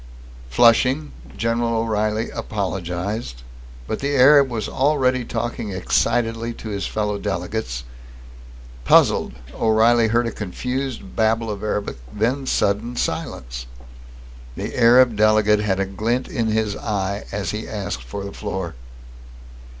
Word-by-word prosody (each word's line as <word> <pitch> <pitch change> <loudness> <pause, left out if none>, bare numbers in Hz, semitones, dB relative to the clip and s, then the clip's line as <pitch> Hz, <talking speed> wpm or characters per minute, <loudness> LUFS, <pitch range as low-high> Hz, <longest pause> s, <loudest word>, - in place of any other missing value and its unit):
Flushing, 125 - +4 0.3
General 115 0 0
O'Reilly 110 0 -1
apologized, 95 - -4 0.4
but 110 - -3
the 140 +1 -1
Arab 140 +1 +7
was 110 -4 -3
already 130 -2 +1
talking 120 -2 -3
excitedly 115 +4 0
to 110 - -8
his 100 -2 -3
fellow 105 -1 -2
delegates. 85 - -3 1.0
Puzzled, - - +4 0.2
O'Reilly 115 +1 +3
heard 115 +2 +2
a 115 - -2
confused 125 +7 -4
babble 110 0 +1
of 100 -1 -6
Arabic, 105 -1 -2
then 125 - -1
sudden 110 +4 0
silence. - - -4 0.9
The - - -5
Arab 120 0 +6
delegate 105 0 +4
had 100 -2 0
a 100 - +1
glint 110 +6 -1
in 125 -11 -1
his 110 -2 0
eye 100 -2 -3
as 100 -1 -2
he 105 +1 -5
asked 100 -8 -4
for - - -6
the 100 - -7
floor. 95 -5 -4
110 Hz, 125 wpm, -22 LUFS, 100-120 Hz, 1.0 s, Arab